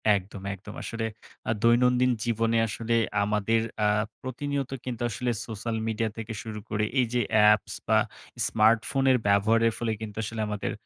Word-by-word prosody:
একদম, 95 Hz, 0 st, -5 dB
একদম। 100 Hz, +2 st, -10 dB
আসলে 115 Hz, -1 st, -3 dB, 0.4 s
আ -, -, +4 dB
দৈনন্দিন 125 Hz, +2 st, +4 dB
জীবনে 115 Hz, 0 st, +1 dB
আসলে 115 Hz, +2 st, -2 dB, 0.3 s
আমাদের 105 Hz, +2 st, +1 dB, 0.2 s
আ -, -, +5 dB, 0.3 s
প্রতিনিয়ত 135 Hz, +1 st, -3 dB
কিন্তু 120 Hz, -2 st, -4 dB
আসলে 120 Hz, +3 st, -1 dB, 0.2 s
সোশ্যাল 110 Hz, +1 st, -4 dB
মিডিয়া 110 Hz, 0 st, 0 dB
থেকে 115 Hz, 0 st, -5 dB
শুরু 110 Hz, -1 st, -6 dB
করে, 105 Hz, 0 st, 0 dB, 0.2 s
এইযে 120 Hz, 0 st, +1 dB
অ্যাপস 105 Hz, -1 st, +4 dB
বা, -, -, +4 dB, 0.5 s
স্মার্টফোনের 115 Hz, +4 st, +3 dB
ব্যবহারের 110 Hz, +3 st, +3 dB
ফলে 115 Hz, -2 st, -1 dB
কিন্তু 105 Hz, -2 st, -6 dB
আসলে 110 Hz, +1 st, -4 dB
আমাদের 105 Hz, -1 st, -3 dB
115 Hz, 145 wpm, -27 LUFS, 105-120 Hz, 0.5 s, আ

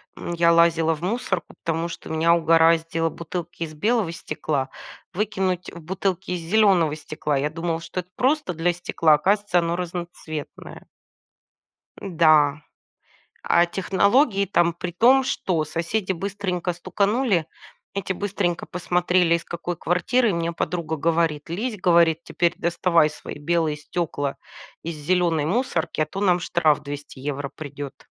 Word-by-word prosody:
М, 175 Hz, -, -5 dB
я 170 Hz, 0 st, +4 dB
лазила 165 Hz, -1 st, +4 dB
в 150 Hz, -, -14 dB
мусор, 190 Hz, -2 st, -1 dB
потому 165 Hz, +1 st, -3 dB
что -, -, -9 dB
меня 165 Hz, +2 st, +3 dB
угораздило 165 Hz, 0 st, +3 dB
бутылки 170 Hz, 0 st, -6 dB
из 155 Hz, -1 st, -6 dB
белого 210 Hz, +2 st, 0 dB
стекла 145 Hz, -5 st, -3 dB, 0.4 s
выкинуть 190 Hz, -2 st, -2 dB
в 170 Hz, -, -10 dB
бутылки 190 Hz, +2 st, -2 dB
из 180 Hz, -2 st, -2 dB
зелёного 175 Hz, -4 st, +3 dB
стекла. 150 Hz, -1 st, -3 dB
Я 145 Hz, +2 st, 0 dB
думала, 165 Hz, 0 st, -3 dB
что 185 Hz, +2 st, -4 dB
это 180 Hz, -, -24 dB
просто 275 Hz, -, +1 dB
для 170 Hz, +2 st, +1 dB
стекла, 165 Hz, -3 st, +2 dB
оказывается, 200 Hz, +3 st, +1 dB
оно 170 Hz, 0 st, +1 dB
разноцветное. 170 Hz, -3 st, -7 dB, 1.2 s
М-да, 155 Hz, -5 st, +3 dB, 0.8 s
а 170 Hz, -, +4 dB
технологии 200 Hz, -, +2 dB
там 170 Hz, -3 st, +2 dB
при 175 Hz, +1 st, -5 dB
том, 250 Hz, +9 st, +5 dB
что 185 Hz, -11 st, -1 dB
соседи 180 Hz, +6 st, -2 dB
быстренько 185 Hz, -1 st, -3 dB
стуканули, 200 Hz, -, 0 dB, 0.5 s
эти 195 Hz, -1 st, -2 dB
быстренько 185 Hz, -3 st, -2 dB
посмотрели, 180 Hz, -1 st, +2 dB
из 170 Hz, -, -3 dB
какой 175 Hz, +1 st, -5 dB
квартиры. 190 Hz, +8 st, +1 dB
Мне 170 Hz, 0 st, -1 dB
подруга 160 Hz, -1 st, -2 dB
говорит: 160 Hz, -1 st, 0 dB
"Лезь". 215 Hz, +6 st, -3 dB
Говорит: 170 Hz, -3 st, +4 dB
"Теперь 170 Hz, -1 st, 0 dB
доставай 170 Hz, -2 st, +2 dB
свои 150 Hz, -, -9 dB
белые 160 Hz, 0 st, 0 dB
стёкла 150 Hz, -2 st, -3 dB, 0.5 s
из 165 Hz, -1 st, -4 dB
зелёной 165 Hz, 0 st, +1 dB
мусорки, 180 Hz, -6 st, -1 dB
а -, -, +3 dB
то 170 Hz, +6 st, -7 dB
нам 180 Hz, -3 st, +3 dB
штраф 160 Hz, -4 st, +2 dB
200 145 Hz, -1 st, -8 dB
евро 140 Hz, 0 st, -4 dB
придёт". 145 Hz, -2 st, -8 dB
170 Hz, 140 wpm, -23 LUFS, 160-185 Hz, 1.2 s, том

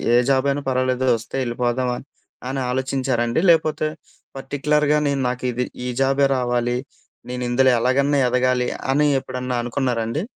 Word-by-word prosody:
ఏ -, -, +6 dB
job 135 Hz, 0 st, +2 dB
అయినా 145 Hz, +1 st, -2 dB
పర్వాలేదు 130 Hz, 0 st, 0 dB
వస్తే 115 Hz, -, -9 dB
ఎళ్ళిపోదాం 120 Hz, +1 st, -1 dB
అని. -, -, -9 dB, 0.4 s
అని 135 Hz, 0 st, -2 dB
ఆలోచించారండి 130 Hz, 0 st, 0 dB
లేకపోతే, 155 Hz, -2 st, +3 dB, 0.5 s
పర్టిక్యులర్‌గా 150 Hz, +2 st, +1 dB
నేను 140 Hz, -1 st, 0 dB
నాకు 125 Hz, 0 st, -5 dB
ఇది, 125 Hz, +1 st, -2 dB, 0.2 s
ఈ -, -, -2 dB
జాబే 135 Hz, +1 st, +3 dB
రావాలి. 120 Hz, -1 st, 0 dB, 0.5 s
నేను 125 Hz, 0 st, -4 dB
ఇందులో 130 Hz, +2 st, +4 dB
ఎలాగన్నా 140 Hz, +4 st, +2 dB
ఎదగాలి 125 Hz, 0 st, +1 dB, 0.2 s
అని 145 Hz, +2 st, +3 dB
ఎప్పుడన్నా 125 Hz, -1 st, -4 dB
అనుకున్నారండి? 120 Hz, +1 st, -1 dB
130 Hz, 140 wpm, -21 LUFS, 125-140 Hz, 0.5 s, ఏ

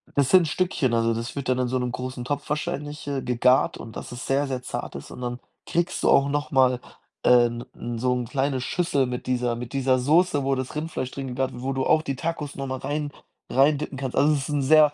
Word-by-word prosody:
Das 140 Hz, -2 st, +3 dB
sind 180 Hz, -3 st, +6 dB
Stückchen, 160 Hz, -6 st, 0 dB
also, 115 Hz, 0 st, +2 dB
das 115 Hz, +1 st, -4 dB
wird 140 Hz, -3 st, -3 dB
dann 130 Hz, 0 st, +2 dB
in 125 Hz, -, +1 dB
so 130 Hz, -, 0 dB
'nem 125 Hz, 0 st, -2 dB
großen 125 Hz, 0 st, -5 dB
Topf 145 Hz, +3 st, -3 dB
wahrscheinlich, 150 Hz, 0 st, -3 dB
äh, 140 Hz, -2 st, -1 dB
gegart 125 Hz, +1 st, +3 dB
und 115 Hz, -, -10 dB
das -, -, -7 dB
es 125 Hz, -, -6 dB
sehr, 140 Hz, +1 st, +1 dB
sehr 130 Hz, -2 st, -3 dB
zart -, -, -5 dB
ist. 70 Hz, -, -8 dB
Und -, -, -9 dB
dann 120 Hz, 0 st, -3 dB, 0.3 s
kriegst 170 Hz, +1 st, -1 dB
du -, -, +3 dB
auch 140 Hz, +1 st, +5 dB
noch 145 Hz, +1 st, -1 dB
mal, 130 Hz, -2 st, +4 dB, 0.4 s
äh, 120 Hz, -1 st, +6 dB
'n 120 Hz, 0 st, -6 dB
n 120 Hz, -1 st, -5 dB
so 125 Hz, +1 st, +2 dB
'n 125 Hz, -1 st, -1 dB
kleine 135 Hz, +2 st, -1 dB
Schüssel 165 Hz, -1 st, +1 dB
mit 125 Hz, 0 st, -5 dB
dieser 125 Hz, -2 st, 0 dB
mit 120 Hz, +1 st, -7 dB
dieser 130 Hz, -1 st, +2 dB
Soße, 150 Hz, +3 st, +3 dB
wo 135 Hz, -, +2 dB
das 130 Hz, +1 st, -4 dB
Rindfleisch 150 Hz, -4 st, -3 dB
drin 135 Hz, -1 st, -5 dB
gegart 130 Hz, +1 st, -1 dB
wo 130 Hz, +2 st, -3 dB
du 130 Hz, 0 st, -1 dB
auch 155 Hz, -, +4 dB
die 135 Hz, -4 st, -3 dB
Tacos 150 Hz, -1 st, -4 dB
noch 135 Hz, -1 st, -4 dB
mal 130 Hz, -, -3 dB
rein 145 Hz, +1 st, -3 dB, 0.4 s
reindippen 140 Hz, +1 st, +2 dB
kannst. 130 Hz, -2 st, -4 dB
Also, 150 Hz, +2 st, +4 dB
es 145 Hz, -, +1 dB
ist 135 Hz, -, -5 dB
'n 145 Hz, -1 st, +1 dB
sehr 150 Hz, +2 st, +6 dB
135 Hz, 245 wpm, -25 LUFS, 125-145 Hz, 0.4 s, sind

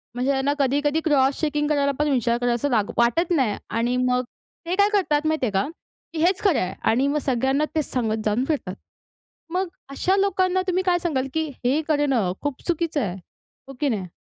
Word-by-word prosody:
म्हणजे 255 Hz, +3 st, +1 dB
त्यांना 275 Hz, +1 st, +1 dB
कधी-कधी 290 Hz, +3 st, +1 dB
क्रॉस 275 Hz, -3 st, +3 dB
चेकिंग 295 Hz, -1 st, 0 dB
करायला 285 Hz, -2 st, +2 dB
पण 300 Hz, 0 st, +2 dB
विचार 240 Hz, -3 st, +1 dB
करायला 245 Hz, 0 st, +1 dB
असं 265 Hz, +5 st, -1 dB
वा 225 Hz, -3 st, +4 dB, 0.2 s
वाटत 240 Hz, +10 st, +2 dB
नाही 255 Hz, -9 st, +1 dB
आणि 235 Hz, +2 st, 0 dB
मग 250 Hz, 0 st, +1 dB, 0.4 s
ते 350 Hz, +2 st, -1 dB
काय 405 Hz, +1 st, +4 dB
करतात 310 Hz, -7 st, +2 dB
माहिती 315 Hz, -4 st, +1 dB
आहे 220 Hz, -, -1 dB
का? 195 Hz, +4 st, +1 dB, 0.5 s
की 325 Hz, -, -4 dB
हेच 370 Hz, +2 st, +3 dB
खरं 385 Hz, -8 st, +3 dB
आहे 185 Hz, +1 st, -2 dB, 0.2 s
आणि 255 Hz, +5 st, +2 dB
मग 290 Hz, +2 st, 0 dB
सगळ्यांना 265 Hz, +3 st, +1 dB
तेच 310 Hz, -2 st, +1 dB
सांगत 225 Hz, -4 st, 0 dB
जाऊन 215 Hz, +5 st, +1 dB
फिरतात. 265 Hz, -, -2 dB, 0.8 s
मग 370 Hz, +1 st, 0 dB, 0.2 s
अशा 360 Hz, +7 st, +1 dB
लोकांना 375 Hz, -2 st, +2 dB
तुम्ही 370 Hz, 0 st, +1 dB
काय 360 Hz, -1 st, +2 dB
सांगाल 285 Hz, -7 st, -1 dB
की 320 Hz, 0 st, 0 dB, 0.2 s
हे 275 Hz, +5 st, +2 dB
करणं 275 Hz, -, +1 dB
खूप 290 Hz, -2 st, -3 dB
चुकीचं 335 Hz, -3 st, 0 dB
आहे, 190 Hz, -6 st, -2 dB, 0.5 s
हो 270 Hz, -, -9 dB
की 290 Hz, -, +2 dB
नाही? 200 Hz, -6 st, -2 dB
280 Hz, 200 wpm, -23 LUFS, 245-320 Hz, 0.8 s, वा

